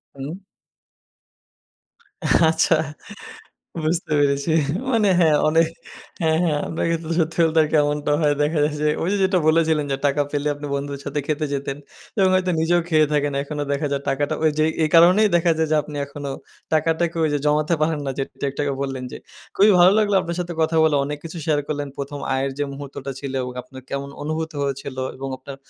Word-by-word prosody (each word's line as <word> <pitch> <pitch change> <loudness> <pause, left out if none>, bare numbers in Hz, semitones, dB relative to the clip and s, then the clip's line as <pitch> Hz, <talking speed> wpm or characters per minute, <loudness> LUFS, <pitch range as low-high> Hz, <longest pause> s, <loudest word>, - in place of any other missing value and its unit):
হুম। 145 +7 -6 2.1
আচ্ছা, 160 0 +2 1.1
বুঝতে 165 +1 -1
পেরেছি। 140 +2 +1 0.4
মানে 220 -4 +3
হ্যাঁ, 155 -3 +5
অনে 160 +2 +4 0.6
হ্যাঁ, 160 0 +2
হ্যাঁ, 150 -3 +1
আমরা 160 - -3
কিন্তু 165 -1 -2
সত্যি 165 +1 -1
বলতে 160 0 +3 0.2
এমনটা 145 0 0
হয় 145 -1 +3
দেখা 150 +1 0
যায় 150 0 -1
যে 150 - +3
ওই 170 - -1
যে - - +1
যেটা 190 -1 +2
বলেছিলেন 160 -2 +3
যে - - 0
টাকা 145 +1 +2
পেলে 145 0 -1
আপনি 145 0 -7
বন্ধুদের 140 0 -4
সাথে 145 - -2
খেতে 155 0 -1
যেতেন। 140 0 -3 0.4
এবং 190 -1 +5
হয়তো 185 -1 +1
নিজেও 175 +2 +3
খেয়ে 155 -2 +4
থাকেন। 145 -1 +1
এখনো 145 0 -4
দেখা 140 +1 -1
যায় 140 0 -1
টাকাটা 140 +1 0
ওইযে 155 0 +2
এ - - -5
এই 155 - +2
কারণেই 180 +6 +6
দেখা 170 0 +2
যায় 160 - +2
যে 155 - +3
আপনি 150 -1 -9
এখনো 140 0 -7 0.4
টাকাটাকে 165 +2 +1
ওই - - +2
যে - - +1
জমাতে 150 +3 +2
পারেন 155 -1 +1
না - - -1
যেটা 135 +1 -5
একটু 140 - -6
আগে 140 -1 -1
বললেন 135 -2 -4
যে। - - -5 0.4
খুবই 205 +2 +6
ভালো 180 +2 +7
লাগলো 205 -2 +2
আপনার 170 -1 -4
সাথে 175 0 -4
কথা 160 +1 0
বলে, 150 -2 +3
অনেক 145 +1 -4
কিছু 165 +1 -7
শেয়ার 150 -2 +2
করলেন। 145 -2 -3
প্রথম 140 +1 -5 0.2
আয়ের 135 +1 0
যে 145 - 0
মুহূর্তটা 140 -1 -7
ছিল 135 -1 -5 0.3
আপনার 130 0 -12
কেমন 140 0 -3
অনুভূত 160 +1 -3
হয়েছিল 135 -1 -4 0.2
এবং 135 +1 -5
আপনার 135 +1 -9
150 Hz, 190 wpm, -22 LUFS, 140-165 Hz, 2.1 s, ভালো